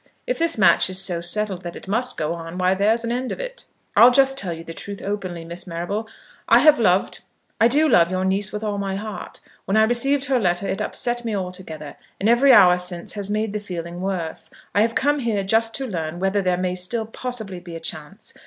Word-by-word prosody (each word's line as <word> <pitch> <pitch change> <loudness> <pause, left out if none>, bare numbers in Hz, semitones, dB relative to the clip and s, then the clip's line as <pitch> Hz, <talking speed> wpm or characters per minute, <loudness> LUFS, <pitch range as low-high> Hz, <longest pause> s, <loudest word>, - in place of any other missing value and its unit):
If - - -2
this 330 -4 +1
match 185 -3 +4
is 185 0 -1
so 175 -3 -1
settled 190 +1 -1
that 175 -1 -7
it - - -11
must 235 +6 0
go 155 +1 -1
on, 165 +1 -7
why 185 0 +2
there's 215 +4 +2
an 230 - -2
end 250 +1 -2
of - - -5
it. - - -7 0.3
I'll 240 - +9
just 270 +1 +3
tell 195 -10 -2
you 165 0 -6
the 165 - -8
truth 200 +4 -7
openly, 185 -4 -5
Miss 170 +2 -7
Marrable. 180 +6 -4 0.4
I 230 - +8
have 300 -2 +6
loved, 185 -4 +2 0.4
I 230 - +6
do 295 +6 +3
love 170 - +4
your 185 0 -1
niece 195 +2 +1
with 210 +1 -5
all 205 -2 -2
my 195 -1 -2
heart. 210 +1 -7 0.2
When 195 - +1
I 220 - +6
received 270 +5 +2
her 265 -2 +1
letter 180 -1 0
it - - -2
upset 240 0 -2
me 225 -3 -2
altogether, 180 -6 -6 0.2
and 200 - 0
every 240 +4 +5
hour 180 -6 +7
since 180 -1 -3
has 205 -1 -4
made 215 0 -1
the 210 - -2
feeling 175 -3 -6
worse. 185 -4 -3 0.2
I 205 - +3
have 230 +1 +1
come 290 +2 +2
here 225 -6 -1
just 225 +3 +1
to 270 - -3
learn 170 -6 -4
whether 195 +2 +1
there 180 -1 +1
may 180 0 -1
still 185 +5 -2
possibly 220 -5 -5
be 175 -1 -10
a - - -5
chance. 165 +6 -7
200 Hz, 230 wpm, -22 LUFS, 180-230 Hz, 0.4 s, I'll